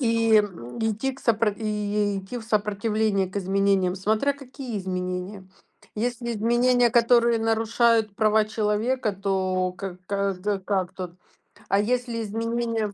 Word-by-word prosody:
И, 230 -2 +2
м, 185 - -1
идти 225 +4 -1
к 265 - -14
сопро 225 -1 +2
и 210 -1 -1
идти 195 +6 -6
в 225 - -10
сопротивление 210 -2 0
к 190 - -9
изменениям. 195 -1 +1
Смотря 215 +8 +1
какие 260 -4 -7
изменения. 185 +1 -4 0.6
Если 235 +2 -2
изменения, 240 +2 +3
которые 235 0 +4
нарушают 225 -1 +2
права 215 0 +3
человека, 215 +2 0
то 185 -2 0
ка 190 -2 -6
как, 200 -1 -1
з 180 +3 -15
э, 200 - 0
как 190 -2 -1
тут? 185 -2 -6 0.6
А 195 - +3
если 235 +1 -1
изменения 225 0 -2
215 Hz, 140 wpm, -25 LUFS, 195-230 Hz, 0.6 s, которые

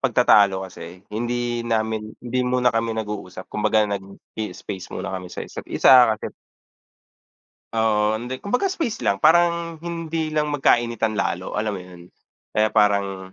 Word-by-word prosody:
pagtatalo 105 -7 +4
kasi, 90 0 -11
hindi 120 +1 -2
namin 110 -2 -2
hindi 125 +1 -3
muna 125 -1 +2
kami 115 0 -1
nag-uusap 105 -4 -5
kumbaga 105 0 +2
nag-ii-space 100 -1 -7
muna 90 - -4
kami 90 -1 -6
sa - - -6
isa't-isa 120 -4 +4
kasi - - -7 1.4
Oo. 110 -1 +1
Hindi, 125 +2 -5
kumbaga 250 - 0
space 325 - -3
lang, 100 - +1
parang, 170 - +3
hindi 165 -2 -3
lang 150 -1 -1
magkainitan 120 -5 +1
lalo, 90 0 -2
alam 105 0 -1
mo 95 - -5
'yon, 90 -1 -13 0.5
kaya 110 0 +3
parang 100 -3 +1
110 Hz, 135 wpm, -22 LUFS, 100-130 Hz, 1.4 s, pagtatalo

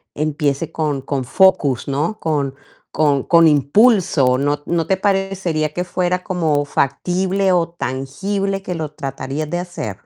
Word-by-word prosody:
empiece 150 0 -1
con 150 -4 -2
con 135 -1 -3
focus, 145 - +2
¿no?, 150 +10 -1
con 145 -4 -1 0.4
con 145 -3 +1
con 170 -1 +5
impulso, 150 - +3
¿no 145 +1 -1
no 170 -1 -1
te 190 - +1
parecería 190 -6 -1
que 180 - -2
fuera 180 0 -1
como 155 -5 0
factible 185 +7 0
o 170 -1 +1
tangible 190 +8 -3
que 180 - -4
lo 155 -2 -4
tratarías 145 +1 -5
de 175 - -1
hacer? 175 - -5
160 Hz, 145 wpm, -19 LUFS, 140-185 Hz, 0.4 s, con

